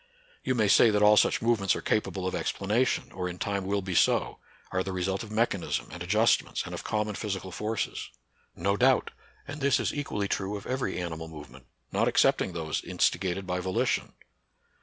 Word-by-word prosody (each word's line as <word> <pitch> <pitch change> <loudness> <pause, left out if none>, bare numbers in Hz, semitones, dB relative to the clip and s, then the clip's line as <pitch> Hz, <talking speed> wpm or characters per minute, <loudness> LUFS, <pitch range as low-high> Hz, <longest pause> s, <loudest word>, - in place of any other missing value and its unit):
You 130 - 0
may 110 -3 +2
say 115 - +6
that 105 -1 +2
all 105 0 +7
such 105 - +3
movements 115 -5 +2
are - - -4
capable 100 -3 -1
of 95 - -1
explanation, 110 +6 0
or 90 -1 -3
in 90 - -7
time 100 0 -2
will 100 0 0
be 95 -1 -4
so; - - +2 0.3
are 90 - 0
the 95 - -3
result 95 +2 -1
of 110 - -8
mechanism, 110 -4 -1
and 85 - -9
adjustments, 105 +6 +2
and - - -7
of - - -5
common 105 0 -1
physical 95 -2 -4
forces. 105 +4 -3 0.5
No 100 +4 0
doubt; 130 +3 +3 0.4
and 145 0 -7
this 140 0 +3
is - - -1
equally 105 -8 -2
true 100 +1 -2
of 100 - -10
every 130 -8 -2
animal 80 -2 -5
movement, 75 -5 -12 0.2
not - - +1
excepting 90 - +3
those 80 -2 -2
insti - - +1
gated 95 0 -2
by 90 0 -2
volition. 95 0 -1
100 Hz, 190 wpm, -28 LUFS, 90-110 Hz, 0.5 s, all